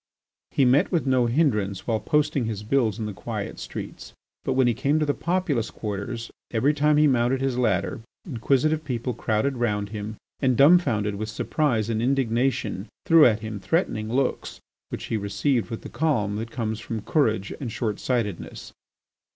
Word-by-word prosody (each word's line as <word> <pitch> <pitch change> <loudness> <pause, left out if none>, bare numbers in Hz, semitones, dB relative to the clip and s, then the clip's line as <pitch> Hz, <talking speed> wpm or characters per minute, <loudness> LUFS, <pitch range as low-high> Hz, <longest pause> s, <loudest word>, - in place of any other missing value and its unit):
He 135 - +2
met 130 +4 +4
with 170 -6 +1
no 130 -2 +3
hindrance 110 - +1
while 115 -2 0
posting 145 -3 +1
his 105 -2 -4
bills 110 -3 +1
in 110 - -3
the 105 - -4
quiet - - -5
streets, - - -7 0.3
but 130 - 0
when 130 0 +3
he 120 - +3
came 140 +7 +1
to 155 - +1
the 145 - +1
populous 170 -11 -1
quarters, 110 +3 -5 0.2
every 130 +6 +2
time 150 0 +3
he 150 - +5
mounted 130 -1 +2
his 135 -1 0
ladder, 110 -5 0 0.2
inquisitive 150 - +1
people 125 -3 -3
crowded 115 +4 0
round 105 -4 -1
him 105 0 -6 0.2
and, 130 -3 +2
dumbfounded 135 - +4
with 110 +1 -4
surprise 110 0 0
and 115 -1 -1
indignation, 125 -4 0 0.2
threw 165 -3 +7
at 110 -2 +1
him 110 -1 -5
threatening 110 - -1
looks 130 +1 -1 0.3
which - - -5
he 115 - -2
received 105 +5 0
with 115 - -5
the - - -6
calm 120 -7 0
that 115 +1 -4
comes 110 -2 -3
from 110 0 -5
courage 110 -10 +1
and 125 -5 -4
short 110 -2 -2
sightedness. 115 -8 -3
120 Hz, 175 wpm, -25 LUFS, 110-140 Hz, 0.3 s, threw